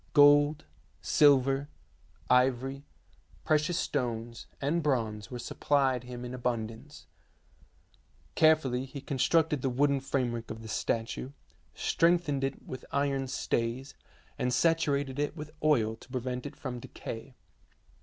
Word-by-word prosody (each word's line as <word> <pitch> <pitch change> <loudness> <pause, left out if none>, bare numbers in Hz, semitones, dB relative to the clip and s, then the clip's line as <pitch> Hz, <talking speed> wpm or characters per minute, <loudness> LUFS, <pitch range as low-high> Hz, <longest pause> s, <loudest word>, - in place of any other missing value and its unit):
Gold, 145 0 +6 0.3
silver, 140 -1 +4 0.6
ivory, 130 +2 +2 0.6
precious 155 +3 +2
stones, 120 -7 -3
and 150 +5 0
bronze 115 -8 -1
were 125 - -5
supplied 130 0 0
him 125 0 -7
in 125 - -6
abundance. 120 +2 -4 1.3
Carefully 140 - +3
he 135 +1 -8
constructed 145 +2 +1
the 135 - 0
wooden 140 +2 +2
framework 125 -4 -2
of 110 0 -7
the - - -8
statue, 115 +4 -2 0.4
strengthened 165 -5 +2
it 135 0 -3
with 130 - -7
iron 140 -1 0
stays, 125 +2 -2 0.5
and 125 - 0
saturated 145 -2 +1
it 145 +2 -1
with 150 0 -7
oil 115 -8 +3
to - - -17
prevent 125 +1 -3
it 145 - -10
from 130 -4 -5
decay. 120 +2 -8
135 Hz, 120 wpm, -30 LUFS, 125-145 Hz, 1.3 s, Gold